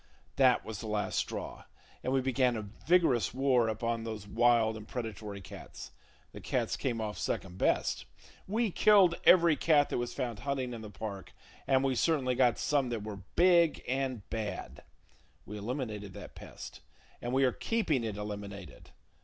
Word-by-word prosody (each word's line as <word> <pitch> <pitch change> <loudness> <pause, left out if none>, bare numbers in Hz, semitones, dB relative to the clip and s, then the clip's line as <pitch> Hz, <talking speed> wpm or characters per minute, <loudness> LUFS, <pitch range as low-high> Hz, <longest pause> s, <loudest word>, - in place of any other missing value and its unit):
That 130 -3 +4
was 110 -2 -6
the 110 - -6
last 105 -1 -1
straw, - - -5 0.4
and 130 - -1
we 135 0 +2
began 130 -1 +1
a 110 - -4 0.2
vigorous 155 - +3
war 130 -3 +3
upon 115 +1 -2
those 110 -3 -6
wild 115 0 +3
and 105 -1 -9
predatory 105 -4 -6
cats. 80 - -10 0.4
The - - -10
cats - - -1
came 120 -3 -2
off 105 -1 -4
second 90 -1 -3
best. - - +1 0.4
We 220 +2 0
killed 195 -3 +5
every 170 -3 +7
cat 145 -2 +3
that - - -1
was 120 0 -3
found 120 -6 -3
hunting 135 -3 -2
in 115 - -7
the 110 - -8
park, 100 -1 -7 0.3
and 135 -1 +3
we 135 -1 +2
certainly 130 -1 +1
got 125 -1 +3
some 140 -3 +1
that 115 -3 -3
were 105 -1 -6 0.2
big 170 -3 +5
[Page - - -15
75] 130 +2 0
and 125 -6 -5
bad. 110 -2 -5 0.6
We 105 0 -7
eliminated 105 -4 -4
that - - -9
pest, - - -10 0.4
and 120 - -3
we 135 +1 +3
are 130 - +4
keeping 165 - 0
it 110 -3 -3
eliminated. 100 -1 -7
120 Hz, 175 wpm, -31 LUFS, 110-135 Hz, 0.6 s, every